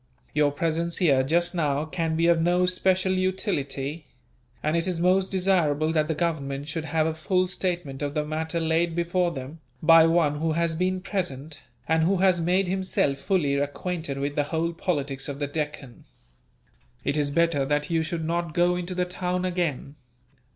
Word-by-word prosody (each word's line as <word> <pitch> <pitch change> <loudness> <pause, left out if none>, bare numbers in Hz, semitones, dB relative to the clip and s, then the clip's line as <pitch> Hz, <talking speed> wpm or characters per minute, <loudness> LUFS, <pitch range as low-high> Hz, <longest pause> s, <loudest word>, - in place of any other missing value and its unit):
Your 150 -1 +3
presence 165 +3 -1
here, 140 -7 +4
just 170 +6 +1
now, 150 -3 0
can 160 0 -2
be 165 +1 +2
of 170 -1 +4
no 175 +2 +3
special 185 +1 +1
utility; 165 -6 -2 0.6
and 155 +2 +1
it 170 +1 0
is 180 -3 -1
most 185 +2 +3
desirable 170 -5 +2
that 155 -1 +2
the 160 - -1
Government 145 -4 -2
should 160 +1 -4
have 155 +1 +1
a 160 - 0
full 185 +3 0
statement 175 -7 -3
of 145 0 -3
the 150 -1 0
matter 160 +2 -2
laid 165 +1 +1
before 175 +1 +1
them, 140 0 -7 0.2
by 165 0 +7
one 160 -3 +2
who 160 0 0
has 170 0 0
been 185 +3 -1
present, 155 -7 -4 0.3
and 160 0 +2
who 185 +4 +2
has 185 -2 +3
made 180 +3 +2
himself 185 -7 0
fully 155 -5 +1
acquainted 145 +1 -3
with 140 +1 -2
the 145 0 0
whole 165 +2 -1
politics 145 -6 -2
of 140 - -5
the 145 - -2
Deccan. 145 -4 -5 1.0
"It 140 - 0
is 145 -2 +1
better 165 -1 +2
that 145 +3 -1
you 165 -1 +2
should 160 0 -3
not 170 -1 -2
go 175 +1 +3
into 180 +1 -4
the 180 0 +1
town 180 0 -2
again. 165 -6 -2
165 Hz, 180 wpm, -26 LUFS, 145-180 Hz, 1.0 s, by